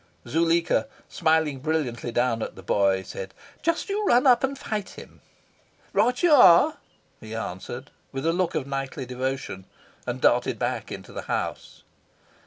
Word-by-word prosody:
Zuleika, 165 - +2 0.2
smiling 160 -3 +1
brilliantly 130 -6 -2
down 120 -1 +1
at - - -5
the 95 - -12
boy, 95 0 +2
said 95 0 -8 0.3
"Just 335 +1 0
you 410 +1 -1
run 245 +3 +4
up 250 -1 +5
and 270 +1 -1
fight 215 -5 -4
him!" - - -13 0.7
"Right 250 +4 +2
you 345 - +5
are," 240 - +7 0.4
he 110 0 -8
answered, 115 +6 -6 0.2
with 135 +2 -4
a 165 - +2
look 180 0 0
of 135 - -1
knightly 135 -1 -4
devotion, 125 -6 -4 0.4
and - - -3
darted - - +2
back - - -3
into - - -8
the - - -5
house. - - -4
140 Hz, 155 wpm, -25 LUFS, 120-185 Hz, 0.7 s, are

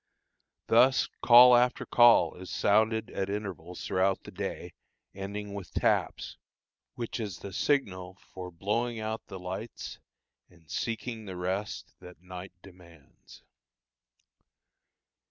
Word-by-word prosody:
Thus 130 +3 +4
call 125 +1 +9
after 125 +1 +2
call 120 -1 +5
is 90 0 -10
sounded 110 +2 +2
at 95 0 -3
intervals 95 -4 -5
throughout 95 +1 +1
the - - -10
day, - - -5 0.4
ending 100 +1 -6
with 100 -3 -8
"taps," - - 0 0.6
which 120 0 -5
is 100 -6 -4
the 100 - -9
signal 95 -9 -1 0.2
for 90 -1 -7
blowing 110 +7 -2
out 110 +1 -4
the 95 - -8
lights, 95 +5 -7 0.5
and 85 -3 -23
seeking 115 -1 -4
the 95 -2 -7
rest 95 +4 -4
which 90 0 -13
night 90 0 -9
demands. 85 -6 -17
100 Hz, 120 wpm, -29 LUFS, 90-115 Hz, 0.6 s, call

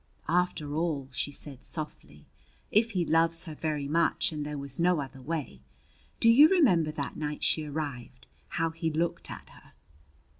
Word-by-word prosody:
"After 165 -4 0
all," 150 -4 -1
she 140 +2 -2
said 140 -2 -9
softly, 75 - -7 0.5
"if 225 +2 +4
he 180 -3 +1
loves 165 +2 +2
her 160 - -6
very 150 -2 -2
much, 165 +3 +2
and 150 -2 -4
there 150 0 -4
was 140 0 -5
no 175 -1 +3
other 135 -1 -6
way 145 - -4 0.6
Do - - +3
you 280 +7 +8
remember 195 - +4
that 145 -3 -4
night 150 -1 -4
she 155 - +2
arrived 140 - -5 0.3
how 165 0 +1
he 165 0 -2
looked 165 +2 -1
at - - -9
her?" - - -18
155 Hz, 165 wpm, -29 LUFS, 145-170 Hz, 0.6 s, you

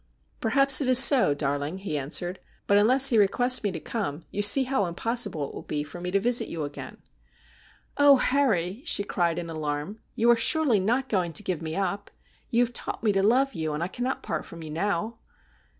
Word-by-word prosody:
' - - -40
Perhaps 275 +4 +3
it 270 - -2
is 255 -1 +6
so, 260 - +7
darling,' 145 +3 -3
he 190 -5 -6
answered; 175 +6 -4
' - - -37
but 200 - +2
unless 255 +6 +4
he 230 - +2
requests 245 +5 +3
me 205 - -2
to 175 - -6
come 170 -9 -5
you 205 - -3
see 205 +7 +5
how 255 -6 -1
impossible 190 - -1
it - - -13
will - - -8
be 150 -1 -4
for 150 +4 -10
me 180 - -4
to 195 +2 +1
visit 240 +4 +1
you 160 -2 -5
again.' 145 0 -9 0.5
' - - -29
Oh, 285 -1 +6
Harry,' 230 -8 0
she 260 -10 +1
cried 175 -4 -2
in 175 -1 -5
alarm, 155 +5 -5
' - - -42
you 235 +1 +3
are - - +5
surely 250 -1 +2
not 240 +7 -1
going 180 -7 -2
to 210 - +1
give 180 -5 -4
me 160 0 -5
up? 200 +1 -3 0.4
You 235 +1 +2
have 240 - -11
taught - - -5
me 215 - +2
to 195 -1 0
love 255 +6 +1
you, 155 -1 -4
and 150 +3 -3
I - - -2
can 240 +6 -7
not 260 +1 -3
part - - -4
from 170 -1 -12
you 155 - -9
now.' 205 +6 -3
200 Hz, 230 wpm, -25 LUFS, 165-245 Hz, 0.5 s, so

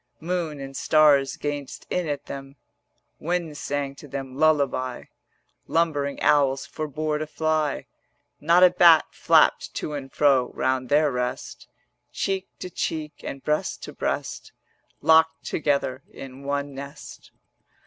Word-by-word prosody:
Moon 165 -3 -3
and 135 0 -8
stars 145 -3 +4
gazed 145 -2 -5
in 180 -3 -1
at 145 -1 -3
them, 135 0 -8 0.6
Wind 170 -2 -2
sang 140 -1 -3
to 145 +1 -13
them 135 -1 -6
lullaby, 140 -4 +1 0.6
Lumbering 145 -4 0
owls 135 -2 +3
forbore 155 0 -3
to 155 - -3
fly, 155 -2 -1 0.5
Not 170 +4 +4
a 180 - +8
bat 170 -3 +6
flapped - - +3
to 150 - -4
and 135 -2 -6
fro 135 -4 +3
Round 130 -1 0
their 150 0 +3
rest: 125 -1 -4 0.4
Cheek 195 -1 -2
to 180 - -7
cheek 155 -3 -4
and 135 - -6
breast 150 0 -1
to - - -7
breast - - -4 0.5
Locked 160 +1 +4
together 140 -4 -1
in 135 0 -10
one 140 0 -2
nest. 140 +2 -10
145 Hz, 130 wpm, -25 LUFS, 135-155 Hz, 0.6 s, a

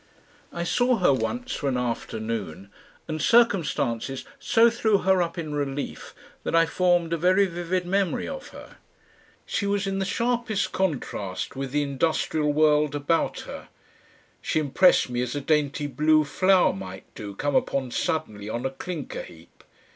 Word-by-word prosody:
I 170 - -3
saw 245 +7 +2
her 180 -8 +4
once, 245 - -2
for 140 - -1
an 125 - 0
afternoon, 110 -6 -4 0.4
and 155 -1 -3
circumstances 150 - +2
so 230 +1 +4
threw 220 -3 +2
her 190 -1 +2
up 170 0 -2
in 155 -3 -4
relief 145 -1 -4 0.3
that - - -1
I 165 0 +6
formed 175 0 +1
a - - +1
very 185 +4 +4
vivid 175 0 -2
memory 195 +1 0
of - - -6
her. - - -13 0.7
She 200 - -2
was 200 0 0
in 195 0 -2
the 190 - 0
sharpest 235 0 -1
contrast 130 - -2
with 135 0 -4
the 145 +1 +1
industrial 150 +1 0
world 150 -1 +3
about 145 +3 0
her; - - -9 0.7
she - - -1
impressed 155 -1 +4
me 120 0 -1
as 125 +2 -3
a - - -1
dainty 150 -1 +1
blue 155 +3 +3
flower 185 +5 +3
might 95 -1 -8
do, 100 -2 -8
come 145 +5 -1
upon 130 -3 0
suddenly 110 -9 -2
on 120 +3 -3
a 135 - -1
clinker 155 +1 -6
heap. 85 0 -15
155 Hz, 160 wpm, -25 LUFS, 135-185 Hz, 0.7 s, I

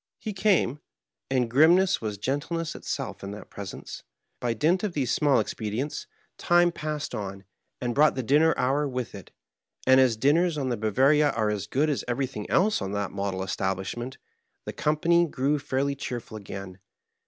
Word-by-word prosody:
'' - - -66
He 215 - -1
came, 190 - +2 0.5
and 130 -2 +1
grimness 170 +10 +4
was 105 -2 -3
gentleness 145 - -2
itself - - -5
in 100 - -5
that 105 - -11
presence. 100 -2 -8 0.4
By 120 -2 -1
dint 170 - +2
of 205 -4 -1
these 135 -6 0
small 145 -3 +3
expedients 115 +7 -3 0.3
time 175 0 +4
passed 155 -4 -4
on 100 -3 -5 0.4
and 120 -1 -2
hrought 150 +1 +5
the 130 - -2
dinner 150 +7 +4
hour 140 +4 +1
with 125 -2 -4
it, 100 - -10 0.6
and 130 0 +6
as 125 -4 +4
dinners 155 +7 +3
on 135 -3 -1
the 120 - 0
Ba/oaria 135 +8 +3
are 110 -2 +1
as 105 -1 -3
good 140 +7 +1
as 145 -3 -1
everything 125 -3 -3
else 210 +4 +2
on 95 +1 -3
that 100 -1 -2
model 100 -1 -3
estahlishment, 95 +7 -3 0.5
the - - -5
company 170 +3 +2
grew 145 +1 0
fairly 140 0 -1
cheerful 125 -5 -6
again. 95 -2 -8
130 Hz, 170 wpm, -26 LUFS, 110-150 Hz, 0.6 s, and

